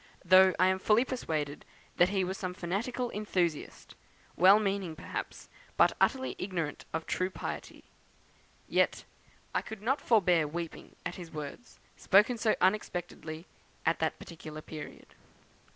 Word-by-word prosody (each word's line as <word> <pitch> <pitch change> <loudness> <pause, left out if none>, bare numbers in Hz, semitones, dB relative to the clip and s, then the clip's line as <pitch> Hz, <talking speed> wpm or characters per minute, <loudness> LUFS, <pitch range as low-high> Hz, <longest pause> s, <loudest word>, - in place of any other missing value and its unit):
Though 185 +1 +7
I 185 - +5
am 190 0 +2
fully 215 +5 +3
persuaded 155 - -3 0.3
that 175 - +5
he 195 -1 +1
was 185 +1 -2
some 185 -2 -4
fanatical 235 +8 -2
enthusiast, 180 -7 -2 0.4
well 190 +5 +7
meaning 195 -5 -1
perhaps, - - -6 0.3
but - - +5
utterly 260 -1 +2
ignorant 175 -6 -3
of 160 0 -3
true 185 0 -1
piety; - - -6 0.8
yet - - +1 0.5
I - - +1
could 220 -2 -9
not 265 +5 +1
forbear 180 -8 +3
weeping 165 +2 -6
at 180 - -4
his 175 -3 -8
words, 150 +10 -8 0.2
spoken 210 +5 +4
so 220 -1 +2
unexpectedly 175 -4 -1 0.4
at - - +2
that - - 0
particular 155 -2 -9
period." 155 -1 -9
185 Hz, 135 wpm, -31 LUFS, 165-210 Hz, 0.8 s, Though